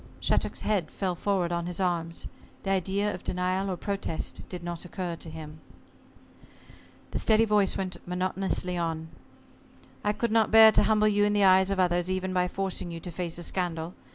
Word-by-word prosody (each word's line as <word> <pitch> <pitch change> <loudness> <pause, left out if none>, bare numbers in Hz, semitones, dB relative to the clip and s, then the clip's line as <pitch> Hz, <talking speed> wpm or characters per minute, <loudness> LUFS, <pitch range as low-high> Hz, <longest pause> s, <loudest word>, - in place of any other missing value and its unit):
Shattuck's - - -1
head 195 -7 0
fell 190 -2 -2
forward 180 -1 0
on 170 0 -2
his 180 +1 -5
arms. 170 -3 -1 0.4
The 195 - -1
idea 195 +2 0
of - - -8
denial 185 +2 -1
or 185 - -2
protest 195 -4 -4
did 180 -1 -7
not 175 -1 -5
occur 180 -1 -4
to 165 - -9
him. 155 -1 -9 1.5
The - - -2
steady 220 0 +4
voice 210 -3 +2
went 185 -2 -3
monotonously 180 0 -1
on. 160 -1 -3 0.9
"I 210 - +2
could 235 +1 -1
not 225 -1 +3
bear 220 0 +9
to - - +4
humble 215 -1 +3
you 205 -1 +3
in 205 0 +2
the 205 -1 +3
eyes 190 0 +6
of 195 -1 -1
others 175 -1 +2
even 185 0 -1
by 180 0 +2
forcing 190 -1 -3
you 165 -1 -6
to 175 +2 -7
face 170 -1 -3
a 175 - -3
scandal. 170 -2 -2
185 Hz, 185 wpm, -28 LUFS, 175-200 Hz, 1.5 s, bear